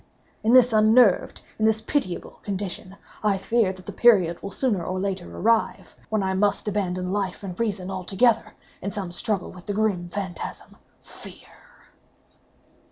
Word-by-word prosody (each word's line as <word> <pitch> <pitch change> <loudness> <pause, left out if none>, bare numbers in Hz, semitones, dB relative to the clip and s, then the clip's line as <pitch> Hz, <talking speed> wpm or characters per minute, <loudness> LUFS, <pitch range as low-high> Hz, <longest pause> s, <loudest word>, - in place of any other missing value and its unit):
In 220 - +3
this 250 -2 +6
unnerved—in 215 -1 +3
this 220 0 +3
pitiable 220 -5 -3
condition—I 195 +1 -3
feel 220 0 +1
that 185 -1 -12
the - - -5
period 185 -8 +4
will 200 - -5
sooner 205 -3 0
or 185 +2 -3
later 190 -2 -3
arrive 230 0 0
when 215 -2 0
I 190 0 0
must 205 +2 +1
abandon 185 -2 -1
life 200 -1 -2
and 190 -2 -5
reason 200 -5 -1 0.2
together, 225 +3 +2 0.3
in 200 - -3
some 195 -4 -5
struggle 190 +2 -2
with 180 -1 -14
the 205 - -1
grim 200 -5 0
phantasm, 185 -2 -6 0.3
FEAR." - - -11
200 Hz, 145 wpm, -24 LUFS, 185-220 Hz, 0.3 s, this